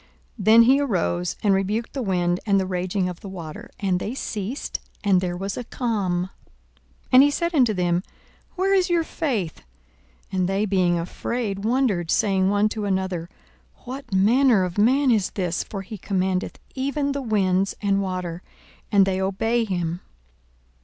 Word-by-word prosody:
Then 220 Hz, +3 st, +7 dB
he 265 Hz, +4 st, +5 dB
arose, 90 Hz, -, -1 dB
and 205 Hz, -2 st, +4 dB
rebuked 205 Hz, +4 st, -1 dB
the 275 Hz, -, -3 dB
wind 180 Hz, -4 st, 0 dB
and 200 Hz, -2 st, +3 dB
the 190 Hz, -, 0 dB
raging 185 Hz, +1 st, -1 dB
of 180 Hz, -2 st, -6 dB
the 200 Hz, -, -9 dB
water: 185 Hz, +4 st, -8 dB
and 190 Hz, -3 st, 0 dB
they 215 Hz, +7 st, -4 dB
ceased, 220 Hz, +1 st, -4 dB, 0.2 s
and 195 Hz, -3 st, +3 dB
there 175 Hz, -1 st, -2 dB
was 195 Hz, +2 st, -4 dB
a 245 Hz, -, -3 dB
calm. 205 Hz, -8 st, -1 dB
42:008:025 185 Hz, -, -7 dB, 0.8 s
And 255 Hz, 0 st, +9 dB
he 285 Hz, -, +6 dB
said 340 Hz, +4 st, -1 dB
unto 250 Hz, -8 st, +4 dB
them, 175 Hz, 0 st, +1 dB, 0.5 s
Where 385 Hz, +1 st, +1 dB
is 375 Hz, -2 st, +3 dB
your 340 Hz, -1 st, +2 dB
faith? 245 Hz, -, -3 dB, 0.7 s
And 185 Hz, -1 st, 0 dB
they 195 Hz, +2 st, +1 dB
being 185 Hz, -3 st, +2 dB
afraid 195 Hz, +4 st, -3 dB
wondered, 220 Hz, -8 st, +1 dB
saying 190 Hz, -1 st, +2 dB
one 205 Hz, +1 st, +3 dB
to 215 Hz, -1 st, -4 dB
another, 190 Hz, -3 st, -2 dB, 0.5 s
What 265 Hz, +1 st, -8 dB
manner 220 Hz, +3 st, +4 dB
of 180 Hz, +2 st, -3 dB
man 260 Hz, +5 st, +4 dB
is 210 Hz, -5 st, +2 dB
this! 180 Hz, -3 st, -2 dB
for 195 Hz, -2 st, -6 dB
he 205 Hz, +2 st, -8 dB
commandeth 185 Hz, -1 st, -1 dB, 0.2 s
even 280 Hz, +2 st, -1 dB
the 280 Hz, 0 st, -2 dB
winds 195 Hz, -5 st, +1 dB
and 200 Hz, -1 st, +1 dB
water, 180 Hz, -3 st, -4 dB, 0.5 s
and 200 Hz, -2 st, +5 dB
they 190 Hz, 0 st, -1 dB
obey 225 Hz, +5 st, 0 dB
him. 175 Hz, -3 st, -2 dB
195 Hz, 165 wpm, -23 LUFS, 185-235 Hz, 0.8 s, And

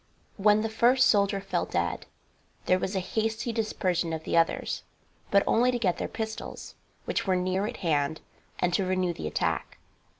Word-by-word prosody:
When 210 Hz, +1 st, +4 dB
the 225 Hz, -, 0 dB
first 240 Hz, +4 st, +4 dB
soldier 200 Hz, -1 st, +3 dB
fell 195 Hz, -, -2 dB
dead -, -, -2 dB, 0.6 s
there 185 Hz, -, +3 dB
was 190 Hz, +2 st, -3 dB
a -, -, +2 dB
hasty 220 Hz, +4 st, -2 dB
dispersion 185 Hz, -7 st, -1 dB
of 160 Hz, -1 st, -4 dB
the -, -, -2 dB
others, 165 Hz, 0 st, +1 dB, 0.5 s
but 200 Hz, 0 st, +4 dB
only 245 Hz, +2 st, +3 dB
to 250 Hz, -, +1 dB
get 190 Hz, -7 st, 0 dB
their -, -, -2 dB
pistols, 220 Hz, -1 st, -6 dB, 0.3 s
which -, -, -2 dB
were 190 Hz, -, +3 dB
near 185 Hz, +2 st, 0 dB
at 240 Hz, -, -6 dB
hand, 150 Hz, -1 st, +1 dB, 0.4 s
and 180 Hz, -1 st, 0 dB
to 195 Hz, -, +2 dB
renew 185 Hz, -1 st, 0 dB
the 75 Hz, -, -5 dB
attack. 75 Hz, -, -2 dB
195 Hz, 175 wpm, -28 LUFS, 180-220 Hz, 0.6 s, When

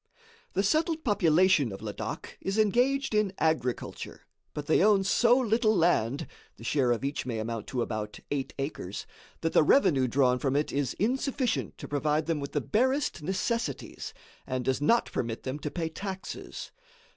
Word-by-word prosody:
The 195 Hz, -, +1 dB
settled 315 Hz, -, +1 dB
population 180 Hz, -, +4 dB
of 95 Hz, -, -8 dB
Ladak 105 Hz, -2 st, -6 dB
is 195 Hz, +2 st, -2 dB
engaged 245 Hz, +5 st, +2 dB
in 210 Hz, -3 st, +2 dB
agriculture, 155 Hz, -6 st, -2 dB, 0.3 s
but 150 Hz, -, -4 dB
they 160 Hz, +4 st, +4 dB
own 205 Hz, -2 st, +5 dB
so 235 Hz, +5 st, +4 dB
little 225 Hz, -3 st, +2 dB
land 145 Hz, -7 st, +2 dB, 0.3 s
(the -, -, -13 dB
share 130 Hz, -5 st, +2 dB
of 120 Hz, +3 st, 0 dB
each 140 Hz, -1 st, -3 dB
may 115 Hz, -3 st, -2 dB
amount 110 Hz, 0 st, -4 dB
to 125 Hz, -3 st, -1 dB
about 105 Hz, -2 st, -4 dB
eight 140 Hz, -2 st, -2 dB
acres) 135 Hz, -, -4 dB, 0.4 s
that 165 Hz, -, -1 dB
the -, -, +6 dB
revenue 150 Hz, -, +4 dB
drawn 125 Hz, 0 st, +3 dB
from 135 Hz, 0 st, 0 dB
it 150 Hz, +1 st, +1 dB
is 140 Hz, -3 st, -1 dB
insufficient 260 Hz, +3 st, -1 dB
to -, -, -8 dB
provide 150 Hz, +2 st, 0 dB
them 165 Hz, -1 st, 0 dB
with 140 Hz, 0 st, -6 dB
the 145 Hz, -, +1 dB
barest 260 Hz, -, +1 dB
necessities 190 Hz, -, -2 dB, 0.4 s
and 130 Hz, -1 st, -2 dB
does 130 Hz, +1 st, 0 dB
not 230 Hz, +10 st, +4 dB
permit 115 Hz, -1 st, -3 dB
them 135 Hz, +3 st, -4 dB
to 150 Hz, -, -3 dB
pay 165 Hz, +1 st, -2 dB
taxes. 190 Hz, +3 st, -6 dB
155 Hz, 170 wpm, -29 LUFS, 130-215 Hz, 0.4 s, the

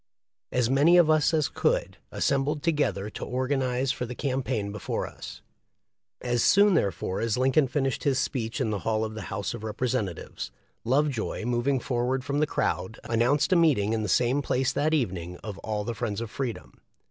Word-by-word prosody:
As 125 Hz, -2 st, +2 dB
many 145 Hz, +7 st, +5 dB
of 165 Hz, -3 st, +6 dB
us 155 Hz, 0 st, +3 dB
as 155 Hz, -3 st, +2 dB
could, -, -, 0 dB
assembled 140 Hz, +2 st, 0 dB
together 145 Hz, -11 st, 0 dB
to -, -, -7 dB
organ 130 Hz, +2 st, -1 dB
ize 130 Hz, +1 st, 0 dB
for 125 Hz, -, -4 dB
the 125 Hz, -, -6 dB
campaign 130 Hz, -7 st, -2 dB
before 105 Hz, -, -3 dB
us. -, -, -10 dB, 0.8 s
As 120 Hz, -1 st, 0 dB
soon 200 Hz, 0 st, +5 dB
therefore 100 Hz, -, 0 dB
as 115 Hz, -1 st, 0 dB
Lincoln 135 Hz, +3 st, +3 dB
finished 135 Hz, 0 st, -1 dB
his 135 Hz, -2 st, +2 dB
speech 115 Hz, -2 st, -2 dB
in 120 Hz, -5 st, 0 dB
the 105 Hz, -, -1 dB
hall 110 Hz, +3 st, 0 dB
of 110 Hz, -, -6 dB
the 110 Hz, -, -6 dB
House 100 Hz, +2 st, -3 dB
of 115 Hz, -2 st, -7 dB
Representatives, 110 Hz, -4 st, -3 dB, 0.3 s
Lovejoy, 130 Hz, -3 st, 0 dB
moving 125 Hz, +3 st, +1 dB
forward 125 Hz, +1 st, -1 dB
from 145 Hz, +1 st, -1 dB
the 155 Hz, -, +2 dB
crowd, 95 Hz, -, -2 dB
announced 125 Hz, +10 st, +2 dB
a -, -, +5 dB
meeting 135 Hz, -, +3 dB
in 110 Hz, -, 0 dB
the 105 Hz, -, -2 dB
same 125 Hz, +6 st, +2 dB
place 130 Hz, -2 st, 0 dB
that 155 Hz, +2 st, +1 dB
evening 90 Hz, -, -2 dB
of 105 Hz, -3 st, -6 dB
all 105 Hz, -1 st, -3 dB
the 120 Hz, -, -3 dB
friends 110 Hz, -3 st, -3 dB
of 115 Hz, -2 st, -5 dB
Freedom. 130 Hz, -5 st, -5 dB
125 Hz, 185 wpm, -27 LUFS, 110-140 Hz, 0.8 s, of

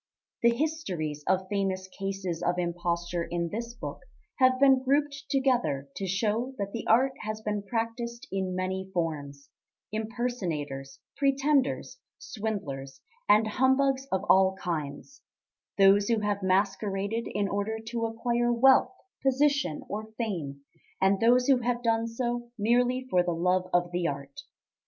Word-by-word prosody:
The 235 Hz, -, +6 dB
histories 205 Hz, -, -2 dB
of 190 Hz, 0 st, +1 dB
famous 190 Hz, -1 st, -1 dB
cases 190 Hz, -3 st, -4 dB
of 175 Hz, +1 st, 0 dB
imposture 175 Hz, 0 st, -1 dB
in 170 Hz, 0 st, -2 dB
this 235 Hz, +4 st, -5 dB
book 240 Hz, -, -6 dB, 0.4 s
have 255 Hz, 0 st, +4 dB
been 270 Hz, -1 st, +6 dB
grouped 280 Hz, +1 st, 0 dB
together 240 Hz, -, +1 dB
to 195 Hz, -, -3 dB
show 220 Hz, +7 st, -1 dB
that 200 Hz, -2 st, -3 dB
the 230 Hz, -, -5 dB
art 255 Hz, +4 st, +4 dB
has 215 Hz, 0 st, -5 dB
been 210 Hz, -1 st, -2 dB
practised 235 Hz, +4 st, -4 dB
in 190 Hz, -1 st, -2 dB
many 190 Hz, +1 st, -3 dB
forms 145 Hz, -4 st, -3 dB, 0.4 s
impersonators, 205 Hz, -, -3 dB, 0.2 s
pretenders, 275 Hz, 0 st, +1 dB, 0.2 s
swindlers, 190 Hz, -, -5 dB, 0.3 s
and 210 Hz, +2 st, +6 dB
humbugs 265 Hz, +4 st, +2 dB
of 190 Hz, 0 st, 0 dB
all 190 Hz, 0 st, +5 dB
kinds; 165 Hz, -, -5 dB, 0.6 s
those 200 Hz, +1 st, +6 dB
who 230 Hz, -2 st, +1 dB
have 205 Hz, -1 st, -1 dB
masqueraded 195 Hz, +3 st, 0 dB
in 205 Hz, -1 st, +1 dB
order 205 Hz, +3 st, -2 dB
to 230 Hz, -1 st, -1 dB
acquire 240 Hz, +1 st, 0 dB
wealth, 265 Hz, +9 st, +5 dB, 0.3 s
position, 270 Hz, -, +1 dB
or 215 Hz, +2 st, -5 dB
fame, 165 Hz, -, -3 dB, 0.4 s
and 195 Hz, +1 st, +3 dB
those 245 Hz, +2 st, +4 dB
who 265 Hz, -2 st, +4 dB
have 240 Hz, 0 st, -1 dB
done 230 Hz, 0 st, +1 dB
so 240 Hz, +1 st, -3 dB
merely 245 Hz, +4 st, +2 dB
for 180 Hz, -8 st, +3 dB
the 175 Hz, -1 st, -1 dB
love 180 Hz, +2 st, +1 dB
of 175 Hz, 0 st, +1 dB
the 175 Hz, -1 st, 0 dB
art. 140 Hz, -1 st, -6 dB
205 Hz, 140 wpm, -28 LUFS, 180-240 Hz, 0.6 s, The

